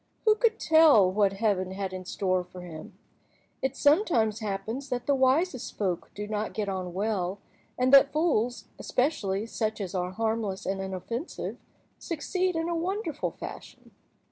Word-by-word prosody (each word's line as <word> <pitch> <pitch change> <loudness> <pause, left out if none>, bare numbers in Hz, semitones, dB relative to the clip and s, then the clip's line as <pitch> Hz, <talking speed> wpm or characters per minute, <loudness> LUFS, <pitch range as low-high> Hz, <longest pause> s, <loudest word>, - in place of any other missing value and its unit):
Who 430 - +7
could 440 0 +1
tell 310 - +6
what 200 0 +2
Heaven 195 -3 0
had 190 -1 -4
in 185 0 -6
store 185 -1 0
for 180 0 -11
him? 165 -3 -10 0.6
It 265 0 -1
sometimes 285 - +3
happens 220 +6 -4
that 245 -2 -2
the 285 - +3
wisest 265 +2 +1
folk 185 -4 -2
do 210 - -4
not 215 0 -3
get 210 -2 -1
on 185 -2 -4
well, 195 -2 -1 0.4
and 255 +2 +2
that 275 0 +8
fools, 260 -7 +1
especially 215 -7 0
such 220 -1 -2
as 190 -4 -4
are 180 -1 -1
harmless 220 -1 -2
and 195 0 -2
inoffensive, 195 - -5 0.4
succeed 360 +3 -1
in 325 0 -1
a 345 - -1
wonderful 340 -2 -2
fashion. - - -10
220 Hz, 155 wpm, -28 LUFS, 195-285 Hz, 0.6 s, that